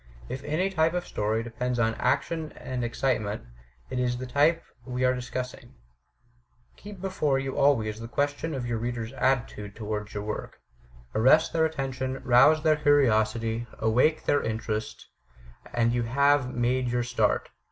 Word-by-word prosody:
If 130 - -5
any 170 +7 0
t)^e 165 -2 +2
of 180 - -2
story 110 +2 -1
depends 125 +1 -3
on 115 -1 +2
action 155 +6 -1
and 125 -1 -5
excitement, 115 -3 -1 0.5
it 130 - -2
is 125 -1 0
the 130 - -5
type 145 +6 +2 0.2
we 125 0 -1
are 125 - +4
dis 125 -1 -6
cussing. 125 0 -6 1.0
Keep 200 -3 -11
before 170 -8 0
you 135 0 -3
always 110 -7 +2
the 115 - -6
question 145 +4 -1
of 130 -2 -3
your 120 -2 -2
reader's 120 0 -4
attitude 115 -7 -1
towards 105 -1 -5
your 105 - -3
work. 105 0 -5 0.5
Arrest 130 +8 +4
their 160 -1 +3
attention, 135 -4 -3
rouse 135 +6 +5
their 155 -1 +4
curiosity, 115 -5 +2
awake 125 +8 +2
their 145 - +3
interest, 110 -1 -3 0.7
and 120 0 +1
you 120 - +1
have 140 +2 +2
made 125 +1 0
your 120 0 0
start. 120 0 0
125 Hz, 155 wpm, -27 LUFS, 115-145 Hz, 1.0 s, rouse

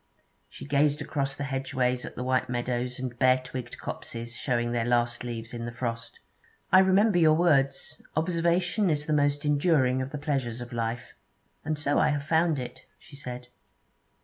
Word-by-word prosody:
She - - -10
gazed 145 +1 +2
across 140 -2 -2
the 145 - -4
hedgeways 130 -2 -1
at - - -9
the 125 - -4
white 130 0 +1
meadows 125 0 -2
and 125 -2 -5
bare 130 -1 +5
twigged 125 -2 -7
copses 115 0 -6
showing 120 -2 -1
their 120 -1 0
last 120 0 +1
leaves 115 -1 -6
in 115 -1 -4
the 120 - -4
frost. 115 -1 -5 0.5
'I 185 - +8
remember 190 +1 +4
your 155 -2 +5
words: 140 -5 +1
"Observation 175 +4 +1
is 150 -2 0
the 155 - 0
most, 145 0 +1
enduring 145 -4 +3
of 130 - -4
the 150 - -5
pleasures 135 -6 -2
of 120 0 -8
life"; 115 +1 -3 0.5
and 155 0 -2
so 145 -1 +1
I - - +4
have 145 -1 -1
found 160 +1 +2
it,' 125 -2 -7
she 140 - -15
said. 125 -3 -7
135 Hz, 175 wpm, -27 LUFS, 120-150 Hz, 0.5 s, I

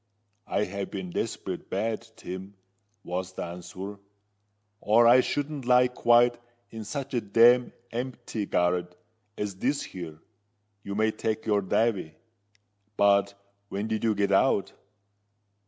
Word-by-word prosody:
"I 100 - +1
have 100 0 -4
been 95 -3 -5
desperate - - -4
bad, 110 +4 -2
Tim," 95 +2 -8 0.5
was 90 +1 -4
the - - -4
answer; 90 +3 -7 0.8
"or 115 +3 +4
I 120 +2 +8
shouldn't 145 0 -3
lie 125 0 +5
quiet 120 -1 +4 0.3
in 110 -1 -7
such 135 +6 -5
a 120 - +1
damned 120 +4 +5 0.2
empty 120 -3 -4
garret 90 0 0 0.4
as 100 -2 -3
this 140 +7 0
here, 85 -4 -8 0.7
you 100 - -5
may 110 +1 +2
take 110 0 -3
your 105 -2 +2
davy. 95 -5 0 0.8
But 100 0 +4 0.3
when 100 +2 -3
did 110 -1 -2
you 110 -2 +2
get 100 0 +1
out?" 100 0 +3
105 Hz, 130 wpm, -27 LUFS, 95-120 Hz, 0.8 s, I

